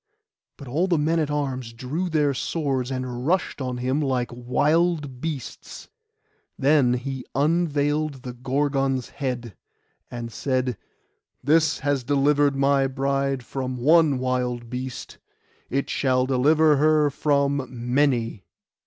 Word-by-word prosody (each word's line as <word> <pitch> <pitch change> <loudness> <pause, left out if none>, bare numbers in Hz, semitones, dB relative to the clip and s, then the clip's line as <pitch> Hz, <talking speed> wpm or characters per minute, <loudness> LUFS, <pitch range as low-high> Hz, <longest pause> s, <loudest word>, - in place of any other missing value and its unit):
But 140 - -10
all 160 +9 0
the 175 -3 +2
men 160 +3 +1
at 155 -2 0
arms 130 -5 -3
drew 145 +10 -3
their 150 -3 +2
swords, 135 -3 -2
and 130 -1 -4
rushed 180 -4 0
on 125 -1 -3
him 130 +4 0
like 130 -4 -1
wild 145 +3 0
beasts. 150 -6 -6 0.7
Then 135 -3 +3
he 130 +1 -4
unveiled 150 -2 0
the 125 - -6
Gorgon's 135 0 -1
head, 120 - -4 0.5
and 120 -1 -6
said, 130 0 -1 0.7
'This 155 +2 +3
has 140 -2 0
delivered 145 +1 +2
my 135 0 +3
bride 135 -1 -1
from 130 -1 -4
one 150 +2 +4
wild 125 -2 -2
beast: 130 0 -6 0.5
it 135 +1 -1
shall 130 -2 +1
deliver 150 +4 +4
her 150 0 +3
from 140 -1 +1
many. 120 -3 0
135 Hz, 125 wpm, -24 LUFS, 125-150 Hz, 0.7 s, one